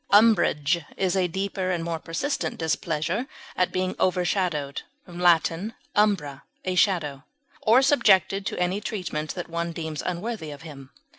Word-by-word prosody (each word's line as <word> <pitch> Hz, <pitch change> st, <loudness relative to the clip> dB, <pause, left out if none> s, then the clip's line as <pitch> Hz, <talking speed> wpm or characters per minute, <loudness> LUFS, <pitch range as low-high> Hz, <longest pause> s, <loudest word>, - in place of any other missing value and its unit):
Umbrage 175 Hz, -7 st, +4 dB
is 190 Hz, -1 st, +1 dB
a 185 Hz, -2 st, +2 dB
deeper 190 Hz, +1 st, -2 dB
and 175 Hz, -2 st, -1 dB
more 165 Hz, -1 st, -3 dB
persistent 270 Hz, -, -2 dB
displeasure 165 Hz, -, -1 dB, 0.3 s
at 180 Hz, -, +1 dB
being 185 Hz, 0 st, -1 dB
overshadowed 175 Hz, -6 st, 0 dB, 0.3 s
(L. 175 Hz, -1 st, +5 dB, 0.6 s
umbra, 175 Hz, -10 st, +1 dB, 0.2 s
a 185 Hz, -, 0 dB
shadow) 160 Hz, -7 st, +1 dB, 0.4 s
or 240 Hz, +4 st, +5 dB
subjected 200 Hz, -8 st, +4 dB
to -, -, -3 dB
any 180 Hz, +3 st, 0 dB
treatment 175 Hz, -8 st, -4 dB
that 175 Hz, -, -5 dB
one 170 Hz, 0 st, -3 dB
deems 160 Hz, -2 st, -4 dB
unworthy 180 Hz, -1 st, -3 dB
of 145 Hz, +1 st, -9 dB
him. 140 Hz, -5 st, -10 dB
180 Hz, 140 wpm, -25 LUFS, 160-195 Hz, 0.6 s, L